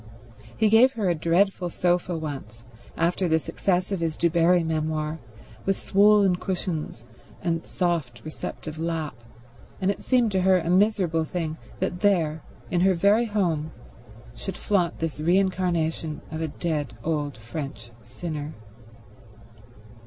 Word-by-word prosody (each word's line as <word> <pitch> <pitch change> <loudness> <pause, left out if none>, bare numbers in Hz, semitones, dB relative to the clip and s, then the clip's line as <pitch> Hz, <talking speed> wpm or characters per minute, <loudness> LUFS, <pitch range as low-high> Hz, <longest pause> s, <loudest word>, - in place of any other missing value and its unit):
He 220 - +4
gave 230 +5 +6
her 205 -7 0
a - - +3
dreadful 175 +3 +1
sofa 175 0 0
once, 135 -8 -6 0.3
after 175 +2 +1
the 160 -1 +3
success 180 +4 -1
of 195 - -1
his 165 -2 -2
Du 170 -1 +2
Barri 170 +1 +4
memoir, 155 0 -1 0.4
with 195 0 +1
swollen 200 -2 +4
cushions 170 - -4 0.4
and 165 -2 0
soft, 165 -10 -1
receptive 155 0 -6
lap, 165 -3 -2 0.7
and 190 +1 +2
it - - -6
seemed 245 -4 +2
to 190 -1 +1
her 190 0 +5
a 170 -1 -1
miserable 185 -4 +3
thing 160 -1 -3 0.2
that 180 -1 -2
there, 165 -6 +2 0.3
in 175 - +2
her 190 0 +4
very 205 +7 +4
home, 170 -8 -1 0.6
should 190 +11 -6
flaunt 180 -5 +1
this 160 -2 -3
re 175 +4 +4
incarnation 170 -5 0
of 160 - -4
a 160 - 0
dead 150 -5 -3
old 150 -4 -1
French 115 0 -7
sinner. 150 +5 -6
170 Hz, 140 wpm, -25 LUFS, 155-190 Hz, 0.7 s, gave